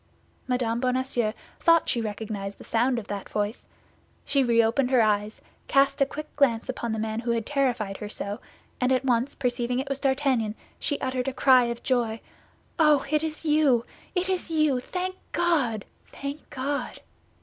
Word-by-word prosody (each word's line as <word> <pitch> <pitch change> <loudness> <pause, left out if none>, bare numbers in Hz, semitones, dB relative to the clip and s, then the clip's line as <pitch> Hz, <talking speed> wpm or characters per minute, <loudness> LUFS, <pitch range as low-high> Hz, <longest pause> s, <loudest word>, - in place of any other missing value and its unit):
Mme. 245 -2 0
Bonacieux 250 -3 0 0.3
thought 335 -1 +4
she 235 - +1
recognized 205 -2 -4
the - - -12
sound 245 +2 +1
of 230 - -4
that 200 -1 -5
voice; 210 +2 -3 0.6
she 275 -1 +2
reopened 235 +2 +3
her 255 -3 +5
eyes, 210 0 0 0.2
cast 275 0 +3
a 275 - +5
quick 305 +2 -8
glance 245 -6 +2
upon 235 -2 -3
the 220 - -1
man 220 0 -2
who 235 0 -4
had 230 -2 0
terrified 245 -9 0
her 210 - -6
so, 205 -1 -4 0.4
and 250 0 +2
at 260 +1 +2
once 250 +2 +1
perceiving 245 -1 -1
it 270 +2 -2
was 275 0 -2
D'Artagnan, 265 -6 +1 0.2
she 285 - -1
uttered 260 -1 -1
a 270 - -1
cry 255 -2 +5
of 235 0 -4
joy, 235 -4 0 0.6
"Oh, 300 -3 +5
it 305 0 +2
is 315 0 -4
you, 295 -6 +3 0.3
it 360 +1 +1
is 370 -2 -1
you! 305 -5 +2
Thank 365 +8 -3 0.2
God, 270 - +1 0.3
thank 280 +2 -6
God!" 280 +2 -3
250 Hz, 170 wpm, -26 LUFS, 225-280 Hz, 0.6 s, her